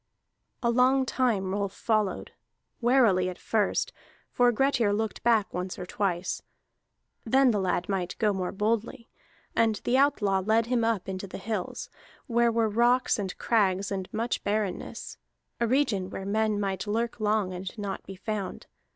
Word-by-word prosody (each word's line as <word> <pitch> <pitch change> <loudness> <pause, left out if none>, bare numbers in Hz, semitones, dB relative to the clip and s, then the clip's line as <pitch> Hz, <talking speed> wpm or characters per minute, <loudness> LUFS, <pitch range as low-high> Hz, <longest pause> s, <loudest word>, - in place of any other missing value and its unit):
A 235 - +3
long 260 +2 +4
time 225 -8 0
Rolf 200 -1 -2
followed, 215 -2 -1 0.5
warily 230 -7 +4
at 180 - -7
first, 215 -3 0 0.4
for 245 0 +4
Grettir 245 -3 +2
looked 220 +1 -2
back 225 -3 +2
once 180 +1 -4
or 180 - -5
twice; 185 -2 -2 0.8
then 260 +2 +4
the 210 - 0
lad 180 -1 0
might 185 -3 -2
go 210 -2 +2
more 185 -2 -2
boldly. 225 +3 -2 0.5
And 225 -1 +3
the 255 +2 +2
outlaw 215 -9 +3
led 220 +4 +2
him 240 -1 +1
up 225 -5 0
into 190 0 -4
the - - -7
hills, 205 -2 -4 0.4
where 235 -2 +2
were 230 -1 +2
rocks 240 +3 +2
and 190 -3 -4
crags 200 -4 +1
and 190 -2 -4
much 230 +2 -2
barrenness, 205 -2 -3 0.4
a 235 - +2
region 225 -8 +1
where 195 - -6
men 215 +1 +1
might 195 0 -2
lurk 230 +3 -1
long 210 -3 +1
and 185 +4 -6
not 200 -2 -4
be 195 - -9
found. 205 -1 -4
215 Hz, 160 wpm, -28 LUFS, 195-235 Hz, 0.8 s, long